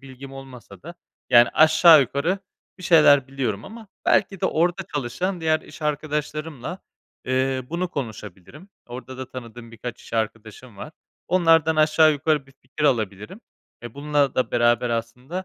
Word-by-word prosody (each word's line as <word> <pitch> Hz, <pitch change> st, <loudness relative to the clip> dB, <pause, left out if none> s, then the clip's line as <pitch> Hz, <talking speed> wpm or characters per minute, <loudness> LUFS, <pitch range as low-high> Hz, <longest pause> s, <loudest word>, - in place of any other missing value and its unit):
bilgim 135 Hz, 0 st, -12 dB
olmasa 135 Hz, -3 st, -12 dB
da, 170 Hz, +3 st, -10 dB, 0.4 s
yani, 120 Hz, -1 st, +7 dB
aşağı 155 Hz, 0 st, +6 dB
yukarı 140 Hz, +9 st, -1 dB, 0.4 s
bir -, -, -12 dB
şeyler 145 Hz, -6 st, +5 dB
biliyorum 120 Hz, -7 st, -3 dB
ama 220 Hz, +1 st, -11 dB, 0.2 s
belki 190 Hz, -1 st, +1 dB
de -, -, +1 dB
orada 175 Hz, +2 st, 0 dB
çalışan 170 Hz, +8 st, -3 dB
diğer 160 Hz, -1 st, +1 dB
iş 155 Hz, -, -14 dB
arkadaşlarımla, 150 Hz, +1 st, -4 dB, 0.5 s
eee, 130 Hz, 0 st, 0 dB
bunu 175 Hz, +1 st, -2 dB
konuşabilirim. 115 Hz, -, -8 dB, 0.2 s
Orada 130 Hz, +1 st, -9 dB
da 130 Hz, 0 st, -7 dB
tanıdığım 120 Hz, -2 st, -10 dB
birkaç 120 Hz, +2 st, -8 dB
iş -, -, -16 dB
arkadaşım 110 Hz, 0 st, -5 dB
var. 150 Hz, +10 st, -9 dB, 0.4 s
Onlardan 165 Hz, -3 st, +3 dB
aşağı 155 Hz, 0 st, +4 dB
yukarı 150 Hz, -1 st, -1 dB
bir 135 Hz, -, -20 dB
fikir 150 Hz, +4 st, -5 dB
alabilirim. 110 Hz, -, -1 dB, 0.4 s
Eee, 120 Hz, 0 st, -9 dB
bununla 145 Hz, -1 st, 0 dB
da 130 Hz, -, 0 dB
beraber 120 Hz, 0 st, +2 dB
aslında, 125 Hz, +10 st, -5 dB
140 Hz, 150 wpm, -23 LUFS, 120-160 Hz, 0.5 s, yani